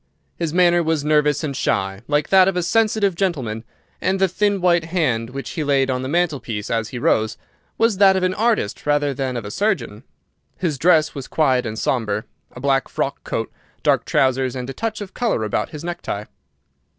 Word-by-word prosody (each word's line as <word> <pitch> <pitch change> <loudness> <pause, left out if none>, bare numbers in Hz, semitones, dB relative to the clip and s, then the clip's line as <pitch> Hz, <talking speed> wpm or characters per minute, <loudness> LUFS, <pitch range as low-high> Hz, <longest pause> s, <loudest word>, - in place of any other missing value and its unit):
His 165 -3 -2
manner 175 0 +4
was 160 -3 0
nervous 150 -1 +2
and 140 -3 -3
shy, 95 -5 -1
like 150 0 +1
that 190 -1 +6
of 195 -2 0
a 180 - 0
sensitive 215 0 +2
gentleman, 135 - -2 0.4
and 190 +2 +1
the 190 - +4
thin 200 +2 0
white 175 -2 +3
hand 140 -10 0
which 135 +2 -6
he 160 - -3
laid 135 -2 +2
on 125 0 -1
the 130 - -4
mantelpiece 145 -11 -1
as 115 -2 -1
he 125 - -6
rose 110 -2 +1 0.4
was 225 -3 +2
that 195 -1 +6
of 190 - 0
an 185 0 +1
artist 215 - 0
rather 145 -1 +2
than 130 -1 -3
of 115 - -5
a 105 - -6
surgeon. 200 - -1 0.6
His 160 -7 -2
dress 160 -1 +4
was 140 -3 -7
quiet 130 -6 +1
and 110 0 -5
sombre—a 110 0 -3
black 135 0 +1
frock - - -3
coat, - - -3 0.3
dark - - +2
trousers, 130 -1 +1
and 125 -1 -4
a - - -8
touch 220 +3 -3
of 195 -2 -7
colour 230 - 0
about 105 0 -1
his 150 0 -8
necktie. 175 -12 -4
150 Hz, 195 wpm, -21 LUFS, 125-185 Hz, 0.6 s, that